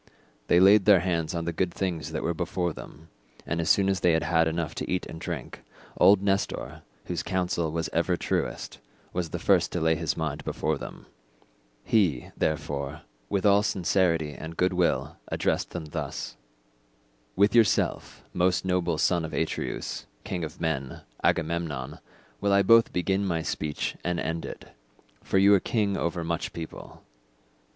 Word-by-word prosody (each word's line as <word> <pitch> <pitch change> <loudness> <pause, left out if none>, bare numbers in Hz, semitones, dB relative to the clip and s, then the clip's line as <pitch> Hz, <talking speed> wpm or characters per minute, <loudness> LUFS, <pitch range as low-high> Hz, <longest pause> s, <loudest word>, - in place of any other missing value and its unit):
They 85 - +5
laid 100 +1 +6
their 100 -3 +7
hands 85 -2 -1
on 85 -1 -2
the 85 - -2
good 90 +1 0
things 85 -5 -3
that 80 - -3
were 85 - 0
before 90 0 -2
them, 80 +2 -12 0.4
and 85 +1 -1
as 80 - -1
soon 100 -1 +4
as 95 -2 +1
they 90 -1 +3
had 80 +1 +2
enough 80 0 -2
to - - -5
eat 90 - 0
and 80 - -9
drink, - - -6 0.3
old 100 0 +5
Nestor, 100 0 -1 0.2
whose 85 -2 -2
counsel 90 -3 -1
was 80 0 -2
ever - - +1
truest, - - -3 0.3
was 90 -2 -2
the - - -3
first - - +3
to 90 - 0
lay 80 0 +3
his 80 -1 -2
mind 80 -3 -3
before - - -1
them. - - -9 0.8
He, 90 - +1
therefore, 75 -1 -2 0.3
with 100 0 0
all 100 0 +6
sincerity 90 -6 +1
and 80 +2 -8
goodwill 90 -1 +1
addressed - - -1
them 85 -3 -6
thus. 75 - -5 1.0
"With 100 +2 +4
yourself, 115 -4 +2
most 90 +1 +1
noble 90 -3 +1
son 85 0 +2
of 80 - -6
Atreus, - - -3 0.2
king 90 -2 -3
of 80 +2 -6
men, 70 -5 -2 0.2
Agamemnon, 80 -5 -1 0.4
will 100 -1 +1
I 100 0 +5
both 115 +3 +6
begin 95 +2 0
my 85 -4 -1
speech 75 -1 -3
and 90 0 -1
end 80 0 -3
it, - - -8 0.6
for - - 0
you 100 +1 +6
are 100 - +6
king 100 -1 0
over 85 -1 -2
much 85 0 -3
people. 80 -1 -9
85 Hz, 165 wpm, -27 LUFS, 80-95 Hz, 1.0 s, their